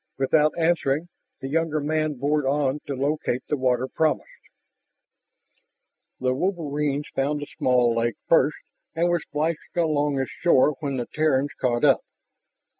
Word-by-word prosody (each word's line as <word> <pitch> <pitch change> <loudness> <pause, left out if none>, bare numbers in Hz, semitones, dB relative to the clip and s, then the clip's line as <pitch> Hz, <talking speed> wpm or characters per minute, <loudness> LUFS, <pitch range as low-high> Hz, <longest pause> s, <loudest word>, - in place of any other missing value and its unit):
Without 150 +4 +2
answering, 165 -1 +1 0.3
the 135 - -4
younger 155 +1 0
man 155 0 -1
bored 145 +3 0
on 140 +1 0
to 140 - -3
locate 140 -2 -1
the - - 0
water 130 -1 +1
promised. 155 +3 0 1.9
The 130 0 +1
wolverines 150 -3 -1
found 145 +2 0
the 145 - -6
small 125 -2 +3
lake 115 0 0
first 155 -2 +3 0.4
and 170 +2 +2
were 175 0 +2
splashing 155 +1 -2 0.2
along 150 -4 +1
its 135 - -2
shore 150 -3 +3
when 140 -4 -3
the 120 - -2
Terrans 145 -2 +1
caught 120 0 0
up. 135 -3 +4
145 Hz, 140 wpm, -24 LUFS, 135-155 Hz, 1.9 s, up